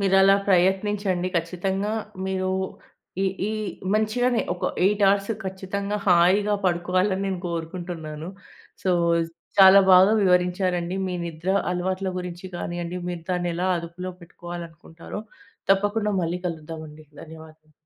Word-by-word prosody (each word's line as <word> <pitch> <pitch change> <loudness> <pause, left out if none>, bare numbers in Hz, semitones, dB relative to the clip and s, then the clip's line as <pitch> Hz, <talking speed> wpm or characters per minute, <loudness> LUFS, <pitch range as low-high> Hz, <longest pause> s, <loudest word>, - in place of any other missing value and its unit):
మీరలా 195 0 +5
ప్రయత్నించండి 190 0 +2
ఖచ్చితంగా 190 +5 -1 0.3
మీరు 190 0 -1 0.7
ఈ - - +2 0.3
ఈ - - -2 0.4
మంచిగానే 230 +3 +1
ఒక 180 - -6 0.2
8 205 +2 +2
అవర్స్ 200 +1 +1
ఖచ్చితంగా 195 +2 -3
హాయిగా 190 +4 +4
పడుకోవాలని 185 +2 +1
నేను 190 -2 -2
కోరుకుంటున్నాను. 165 -2 -5 0.5
సో, 190 - +1 0.7
చాలా 195 0 +9
బాగా 185 +3 +7
వివరించారండి. 180 -1 +1
మీ 185 - -3
నిద్ర 170 +2 -4 0.2
అలవాట్ల 185 +2 -1
గురించి 180 0 -6
గానియండి, 175 +1 -4
మీరు 175 -2 -5
దాన్ని 175 -1 0
ఎలా 180 +2 -1
అదుపులో 170 +2 -6
పెట్టుకోవాలి 175 0 -8
అనుకుంటారో 165 +4 -10 0.5
తప్పకుండా 205 +2 +2
మళ్ళీ 170 +2 -2
కలుద్దామండి. 155 -2 -7 0.2
ధన్యవాదము. 160 -1 -14
180 Hz, 115 wpm, -24 LUFS, 170-195 Hz, 0.7 s, చాలా